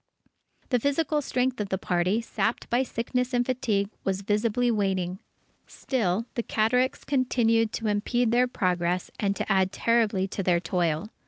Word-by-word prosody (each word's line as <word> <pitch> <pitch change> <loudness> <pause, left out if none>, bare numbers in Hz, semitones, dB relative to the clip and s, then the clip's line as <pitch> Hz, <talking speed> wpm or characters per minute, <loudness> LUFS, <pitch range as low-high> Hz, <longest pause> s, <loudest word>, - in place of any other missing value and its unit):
The 250 - +2
physical 295 +3 0
strength 255 -3 -1
of 200 - -4
the 190 - 0
party, 180 +4 0
sapped 230 0 -2
by 240 +2 +3
sickness 250 +1 -2
and 245 0 +2
fatigue, 220 -6 0
was 195 0 -1
visibly 225 +4 +1
waning. 190 -4 -1 0.5
Still 225 -5 -1
the 235 - -1
cataracts 250 +4 +1
continued 230 -4 +2
to 225 - -4
impede 220 +3 +1
their 245 +1 +3
progress 180 -6 -1
and 200 -1 0
to - - -3
add 190 -1 +3
terribly 220 -5 +1
to 200 - -3
their 175 -2 +2
toil. 170 +2 -1
220 Hz, 155 wpm, -26 LUFS, 190-245 Hz, 0.5 s, by